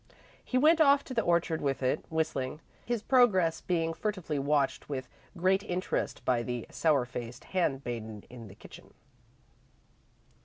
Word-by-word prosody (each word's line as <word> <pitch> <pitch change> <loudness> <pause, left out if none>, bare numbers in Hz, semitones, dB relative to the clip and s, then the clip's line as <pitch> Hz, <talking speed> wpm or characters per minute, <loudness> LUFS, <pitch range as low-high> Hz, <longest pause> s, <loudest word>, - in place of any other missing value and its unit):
He 255 - -1
went 315 +5 +5
off 280 -2 +5
to 260 - -7
the 230 - +2
orchard 170 -3 +1
with 135 -2 -1
it, 130 - +1
whistling, 155 -4 -2 0.2
his 240 -3 -2
progress 195 -11 +3
being 165 -2 0
furtively 185 -6 -3
watched 140 0 0
with 130 -3 -4 0.3
great 190 +3 +3
interest 185 -3 -3
by 125 -2 +2
the 120 -1 -4
sour 150 -6 +2
faced 120 0 -7
handmaiden 120 - -2
in 120 -3 -10
the 95 - -13
kitchen. - - -14
160 Hz, 145 wpm, -30 LUFS, 130-190 Hz, 0.3 s, went